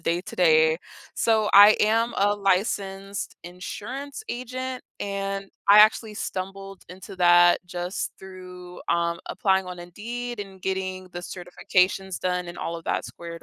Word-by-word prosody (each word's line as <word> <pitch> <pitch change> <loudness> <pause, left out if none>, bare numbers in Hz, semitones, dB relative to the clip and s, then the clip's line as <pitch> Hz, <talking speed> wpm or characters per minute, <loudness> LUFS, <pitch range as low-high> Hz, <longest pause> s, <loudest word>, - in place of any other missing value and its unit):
day-to-day. 165 -2 +2 0.4
So, 220 -2 +2
I 205 +2 +9
am 225 +2 +2
a 205 +1 +3
licensed 195 0 -1
insurance 255 - -7
agent, 255 +1 -5 0.2
and 195 -1 -4 0.2
I 205 +1 +9
actually 215 0 +5
stumbled 195 0 -6
into 190 +2 -10
that 175 0 +6
just 175 +1 -4
through, 180 -1 -11
um, 170 0 +1
applying 190 -2 +1
on 180 -1 -7
Indeed, 235 +7 -6
and 195 -2 -9
getting 185 -1 -3
the 175 - -8
certifications 180 +1 -1
done, 180 -1 -1
and 175 - -8
all 170 - -4
of 165 - -11
that - - -1
squared 170 -1 -9
190 Hz, 135 wpm, -25 LUFS, 180-205 Hz, 0.4 s, I